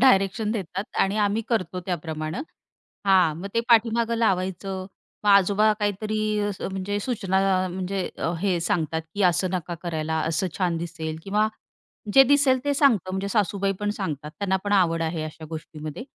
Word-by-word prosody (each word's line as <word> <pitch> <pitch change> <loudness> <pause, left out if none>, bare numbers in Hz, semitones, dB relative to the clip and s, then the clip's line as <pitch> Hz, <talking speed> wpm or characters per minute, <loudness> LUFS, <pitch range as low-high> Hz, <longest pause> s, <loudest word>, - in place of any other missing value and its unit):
Direction 210 -3 +4
देतात 195 -2 -3
आणि 195 +2 +2
आम्ही 210 +2 +1
करतो 185 -6 -1
त्याप्रमाणं. 160 - -3 0.6
हां, 185 -5 +4
मग 200 - -5
ते 230 - +2
पाठीमागं 230 0 +4
लावायचं. 190 -3 -1 0.4
मग 205 - +3
आजोबा 200 +2 +5
काहीतरी 210 +1 -1 0.4
म्हणजे 195 +2 -2
सूचना 195 -4 +1
म्हणजे 190 +1 -3
अ, 165 - -1
हे 185 -3 +1
सांगतात, 160 -2 0
की 205 - -1
असं 180 +1 +3
नका 175 -1 -3
करायला, 160 -2 -2
असं 165 +3 0
छान 175 -3 +1
दिसेल 160 -2 -5
किंवा 210 +2 +2 0.7
जे 270 - +9
दिसेल 280 -1 +4
ते 285 - +2
सांगतात 230 - +3
म्हणजे 190 +1 -2
सासूबाई 200 -1 +1
पण 205 0 -1
सांगतात 150 -7 -4
त्यांना 190 -1 +1
पण 205 - -2
आवड 165 -4 +3
आहे 160 -1 -2
अशा 155 0 -8
गोष्टीमध्ये. 155 +3 -7
190 Hz, 155 wpm, -25 LUFS, 170-210 Hz, 0.7 s, जे